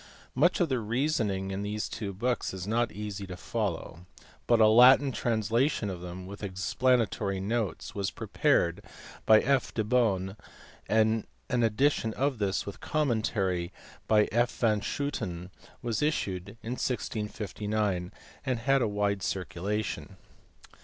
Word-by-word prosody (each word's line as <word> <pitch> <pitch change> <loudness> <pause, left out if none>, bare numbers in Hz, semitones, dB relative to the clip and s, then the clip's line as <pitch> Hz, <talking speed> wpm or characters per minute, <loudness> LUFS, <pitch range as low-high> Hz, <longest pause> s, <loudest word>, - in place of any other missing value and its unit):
Much 160 +8 +3
of 175 - +3
the 130 -4 0
reasoning 110 -5 0
in 95 +1 -3
these 105 +1 -2
two 105 -3 -5
books 120 +1 -1
is 95 -1 -5
not 115 +3 +1
easy 100 -2 -6
to 90 -1 -7
follow; 90 -5 -4 0.4
but 120 -1 +4
a 110 - +7
Latin 125 +5 +7
translation 115 0 0
of 90 -2 -7
them, 90 +1 -7
with 100 +2 -9
explanatory 100 +1 0
notes, 105 -1 -2
was 100 -1 -1
prepared 85 0 +1 0.4
by 110 -1 +8
F. 135 -1 +1
de 110 - -1
Beaune, 105 -5 +1 0.5
and 110 +1 +2 0.2
an 125 -1 +2
edition 115 0 +2
of 135 -2 0
this 100 -2 0
with 100 - -7
a - - -26
commentary 110 - 0 0.4
by 105 -1 +4
F. 120 +2 +3
van 110 -3 +2
Schooten 95 -12 -3 0.3
was 115 +1 -1
issued 100 - -1
in 115 - -4
1659, 105 -5 -2 0.3
and 130 -2 0
had 135 +2 +3
a 115 - +2
wide 100 -1 0
circulation. 95 +2 -3
DESCARTES. - - -26
105 Hz, 145 wpm, -29 LUFS, 95-120 Hz, 0.5 s, by